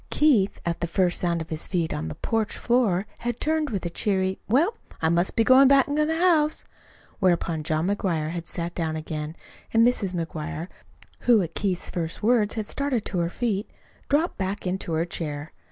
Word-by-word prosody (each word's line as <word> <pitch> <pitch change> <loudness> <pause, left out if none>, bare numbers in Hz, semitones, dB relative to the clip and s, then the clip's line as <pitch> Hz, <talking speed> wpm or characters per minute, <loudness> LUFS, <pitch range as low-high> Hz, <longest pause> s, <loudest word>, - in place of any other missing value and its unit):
Keith, 240 -11 +3
at 170 0 -2
the 170 - 0
first 175 +1 +2
sound 170 -2 0
of 160 - -8
his 155 0 -2
feet 170 -4 -1
on 80 +1 -3
the 80 - -5
porch 225 -1 -1
floor, 225 -6 +2
had 240 0 -3
turned 310 -1 0
with 200 -6 -3
a - - 0
cheery 190 0 0
"Well, 325 - +3 0.2
I 160 - +2
must 170 +2 +1
be 225 - +4
going 260 +3 +7
back 275 -1 +6
to 300 +1 +1
the 320 +1 0
house." 325 -4 +3 0.5
Whereupon 170 -4 +1
John 155 +1 0
McGuire 175 -6 -1
had 170 -1 -5
sat 170 0 -2
down 160 -2 -2
again, 155 0 -5 0.4
and 230 +1 +5
Mrs. 200 -7 0
McGuire, 165 0 -4 0.6
who 230 -5 +6
at 165 - -6
Keith's 190 -4 -2
first 165 +2 -4
words, 220 -2 +3
had 220 -2 -2
started 275 -2 -1
to 180 - -2
her 170 0 0
feet, 210 0 -2 0.4
dropped 305 - +1
back 190 +1 -3
into 180 -2 -2
her 160 +1 +1
chair. 155 -3 -4
190 Hz, 195 wpm, -25 LUFS, 170-240 Hz, 0.6 s, going